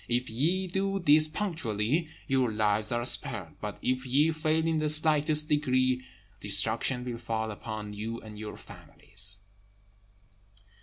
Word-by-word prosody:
If 120 0 -1
ye 170 +11 0
do 195 +2 -1
this 155 -3 +6
punctually, 155 - -2 0.2
your 130 -4 +1
lives 105 0 +1
are 120 0 -1
spared; 105 -8 -1
but 105 -1 -5
if 130 0 0
ye 140 +5 +2
fail 155 0 0
in 165 -1 +1
the 155 0 0
slightest 150 0 +4
degree, 130 -4 +1 0.4
destruction 110 +5 +1
will 120 -2 -5
fall 110 -1 -3
upon 105 0 -7
you 110 +3 -5
and 105 -1 -11
your 105 -1 -7
families." 100 +1 -6
130 Hz, 140 wpm, -28 LUFS, 110-155 Hz, 0.4 s, this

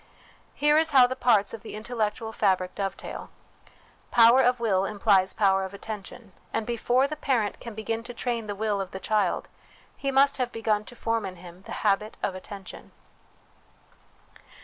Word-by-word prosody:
Here 295 +1 +4
is 320 0 +3
how 265 -4 +7
the 255 +1 -2
parts 220 -6 +2
of 225 - -7
the 225 - -8
intellectual 220 0 -3
fabric 185 -4 +1
dovetail: 195 -1 -5 0.8
power 235 +2 +6
of 250 0 +2
will 200 -5 +1
implies 200 -2 +2
power 195 -2 +2
of 190 +1 -6
attention; 210 +1 -8 0.2
and 225 - -2
before 245 +3 +1
the 305 - -5
parent 250 -8 -1
can 235 -3 -8
begin 225 +1 -3
to 245 - -7
train 235 -2 -2
the 205 - -4
will 205 -1 -1
of 190 - -5
the 190 - -7
child, 210 +2 0 0.5
he 275 - -3
must 275 +1 +4
have 250 -2 -1
begun 215 -2 0
to 245 - -12
form 230 -1 -1
intiim 180 -1 -9
the - - -10
habit 210 +1 +1
of 195 - 0
attention. 190 +1 -10
220 Hz, 170 wpm, -26 LUFS, 200-245 Hz, 0.8 s, how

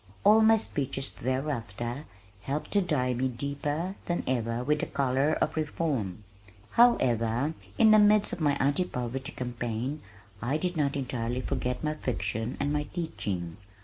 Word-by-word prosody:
All 220 +1 +7
my 220 0 +6
speeches 135 - -2
thereafter 125 -1 -3 0.4
helped 140 +8 -3
to 205 - +4
dye 135 -8 +1
me 130 +2 0
deeper 140 +7 -3
than 175 - 0
ever 120 -1 -1
with 150 +3 +1
the - - -2
color 135 +2 +1
of 155 - 0
reform. 145 - -2 0.5
However, 125 - +3 0.2
in 220 -1 +6
the 215 - +8
midst 210 0 +4
of 175 - -5
my 145 -2 +3
Anti 145 +7 +1
Poverty 130 0 -4
Campaign, 125 +3 -3 0.4
I 130 +6 0
did 180 +2 -2
not 145 -3 +1
entirely 125 -2 -2
forget 125 +1 -2
my 150 0 0
fiction 115 -4 -3
and 145 +1 0
my 150 0 0
teaching. 95 - -4
135 Hz, 150 wpm, -29 LUFS, 120-155 Hz, 0.5 s, the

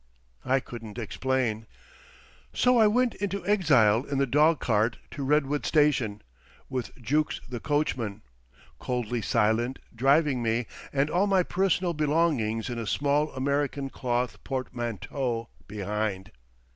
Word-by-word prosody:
I 135 +1 +2
couldn't 115 -3 -9
explain. 120 -1 -1 0.9
So 250 -1 +4
I 220 - +6
went 245 +2 +2
into 200 -2 -4
exile 135 - +4
in 140 -1 -3
the 140 - +3
dog 150 +4 +3
cart 110 0 +1
to 140 - -6
Redwood 145 +1 +1
station, 140 -9 +2 0.5
with 130 -2 -4
Jukes 150 +6 0
the 125 -2 -5
coachman, 130 -9 -1 0.6
coldly 120 -2 -2
silent, 115 +5 +1 0.2
driving 135 +1 +3
me, 115 +1 0 0.3
and 140 +2 +1
all 190 +4 +2
my 190 -2 +3
personal 185 -1 +1
belongings 150 -8 +1
in 120 -2 -4
a 115 - -4
small 145 +4 +1
American 140 0 -1
cloth 125 -1 -2
portmanteau 120 -1 -3 0.2
behind. 105 -1 -3
130 Hz, 125 wpm, -27 LUFS, 115-150 Hz, 0.9 s, I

